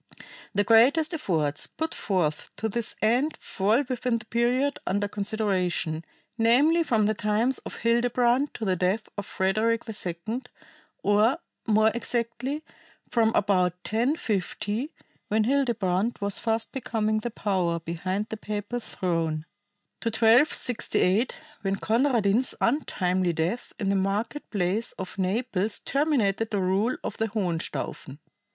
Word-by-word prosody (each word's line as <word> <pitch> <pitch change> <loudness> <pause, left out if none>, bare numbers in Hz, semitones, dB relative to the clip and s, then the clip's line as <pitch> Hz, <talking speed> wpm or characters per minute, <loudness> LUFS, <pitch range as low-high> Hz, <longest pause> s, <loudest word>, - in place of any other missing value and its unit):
The 205 0 +2
greatest 265 - +5
efforts 160 - -1
put 320 0 -3
forth 170 -7 -1
to 220 - -2
this 225 +1 -2
end 250 +8 +2
fall 215 +8 +1
within 250 -2 0
the 220 - -10
period 245 +5 +1
under 205 +1 0
consideration, 195 -6 -1 0.4
namely 280 +9 +4
from 230 -9 +2
the 215 +1 +2
times 215 +5 +1
of - - -8
Hildebrand 245 +3 +2
to 225 - -4
the 190 -2 +2
death 185 +5 0
of 205 - -5
Frederick 220 +5 +1
II, 210 +2 -3 0.6
or, 210 +7 +4 0.3
more 220 0 +4
exactly, 240 +5 -2 0.5
from 230 -2 +3
about 185 -3 +2
1050, 225 - -1 0.4
when 215 +1 +2
Hildebrand 230 -5 +1
was 200 -1 0
fast 225 0 -1
becoming 220 -4 -1
the 240 - -3
power 185 -6 0
behind 185 +5 -3
the 220 - -4
papal 210 +3 -4
throne, 165 -7 -2 0.5
to - - -4
1268, 230 -2 +3 0.2
when 195 -1 0
Conradin's 230 0 +2
untimely 185 - +1
death 165 +9 -2
in 200 -4 -1
the 200 - +2
market 205 +9 -1
place 200 +3 -1
of 190 0 -7
Naples 200 +1 0
terminated 235 -8 +1
the 210 - -1
rule 195 +6 +1
of - - -4
the 225 - 0
Hohenstaufen. 175 -8 -3
215 Hz, 130 wpm, -26 LUFS, 190-240 Hz, 0.6 s, greatest